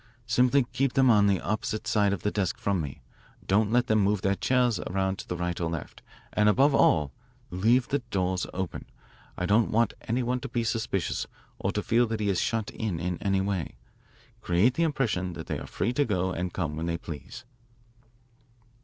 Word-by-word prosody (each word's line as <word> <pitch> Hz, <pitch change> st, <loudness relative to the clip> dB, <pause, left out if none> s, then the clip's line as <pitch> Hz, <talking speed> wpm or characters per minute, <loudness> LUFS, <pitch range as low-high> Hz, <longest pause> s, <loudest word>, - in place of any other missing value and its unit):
Simply 125 Hz, +4 st, +3 dB
keep 130 Hz, +1 st, +1 dB
them 130 Hz, -2 st, +5 dB
on 105 Hz, -2 st, +5 dB
the 100 Hz, -2 st, +2 dB
opposite 110 Hz, +1 st, -2 dB
side 105 Hz, -2 st, +2 dB
of 100 Hz, -, -3 dB
the 105 Hz, -, +1 dB
desk 95 Hz, -4 st, -1 dB
from 100 Hz, -4 st, 0 dB
me. 70 Hz, -3 st, -7 dB, 0.4 s
Don't 105 Hz, +2 st, +2 dB
let 120 Hz, +1 st, +3 dB
them 110 Hz, 0 st, +2 dB
move 100 Hz, -1 st, +2 dB
their 100 Hz, -, +3 dB
chairs 125 Hz, +2 st, +1 dB
around 95 Hz, 0 st, -2 dB
to -, -, -8 dB
the 90 Hz, -, -3 dB
right 90 Hz, 0 st, -2 dB
or 85 Hz, -, 0 dB
left. 85 Hz, -3 st, -6 dB, 0.3 s
And, 105 Hz, 0 st, +4 dB
above 135 Hz, +7 st, +4 dB
all, 75 Hz, -, +3 dB, 0.4 s
leave 115 Hz, +7 st, +2 dB
the 140 Hz, -, +1 dB
doors 90 Hz, -1 st, -1 dB
open. 95 Hz, -2 st, -4 dB, 0.5 s
I 90 Hz, -, -1 dB
don't 105 Hz, +4 st, +3 dB
want 115 Hz, 0 st, +2 dB
any 120 Hz, +3 st, 0 dB
one 125 Hz, +1 st, 0 dB
to 135 Hz, -, -7 dB
be 120 Hz, -1 st, -1 dB
suspicious 110 Hz, -5 st, -1 dB, 0.3 s
or -, -, -1 dB
to -, -, -1 dB
feel 120 Hz, +1 st, +3 dB
that 110 Hz, 0 st, -3 dB
he 105 Hz, -1 st, 0 dB
is 95 Hz, -3 st, +1 dB
shut 110 Hz, -2 st, -1 dB
in 105 Hz, -7 st, -3 dB
in 90 Hz, 0 st, -3 dB
any 95 Hz, -1 st, +1 dB
way. 95 Hz, -8 st, -2 dB, 0.7 s
Create 90 Hz, +8 st, +3 dB
the 165 Hz, -, -2 dB
impression 115 Hz, -, 0 dB
that 80 Hz, -1 st, -7 dB
they -, -, -3 dB
are -, -, -8 dB
free 120 Hz, -, -1 dB
to 145 Hz, -, +2 dB
go 95 Hz, -6 st, 0 dB
and 90 Hz, 0 st, -3 dB
come 80 Hz, -5 st, -3 dB
when 80 Hz, +2 st, -3 dB
they 85 Hz, 0 st, -1 dB
please." 80 Hz, +6 st, -9 dB
100 Hz, 205 wpm, -27 LUFS, 90-120 Hz, 0.7 s, them